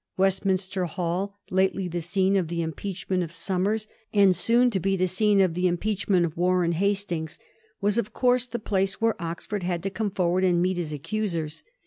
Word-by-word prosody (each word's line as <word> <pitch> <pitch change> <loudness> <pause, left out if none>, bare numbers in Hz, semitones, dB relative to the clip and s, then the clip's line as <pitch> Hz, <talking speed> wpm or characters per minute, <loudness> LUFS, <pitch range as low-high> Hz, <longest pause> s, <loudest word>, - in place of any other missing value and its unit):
West 195 +1 +2
minster 185 -1 0
Hall, 180 +3 -2 0.2
lately 190 0 +1
the 175 0 -3
scene 190 +3 +1
of 185 -4 +1
the 170 0 -2
impeachment 185 +3 -3
of 165 -2 -4
Somers, 195 +5 -1 0.2
and 200 -3 +5
soon 240 +4 +4
to 195 - 0
be 195 +2 +1
the 185 0 +1
scene 200 +2 +2
of 185 -3 +3
the 180 +2 +1
impeach 200 +3 -2
ment 180 -3 +4
of 160 - -5
Warren 180 0 +2
Hastings, 175 -3 -1 0.4
was 205 +3 +2
of 210 - -3
course 250 -1 +2
the 240 0 -4
place 195 -3 -1
where 225 0 +2
Oxford 170 +4 -4
had 175 -1 -2
to 195 - -2
come 210 +2 -2
forward 185 -1 +1
and 180 -2 +3
meet 185 +1 +1
his 165 -3 -3
accusers. 165 -1 -3
185 Hz, 195 wpm, -26 LUFS, 175-200 Hz, 0.4 s, and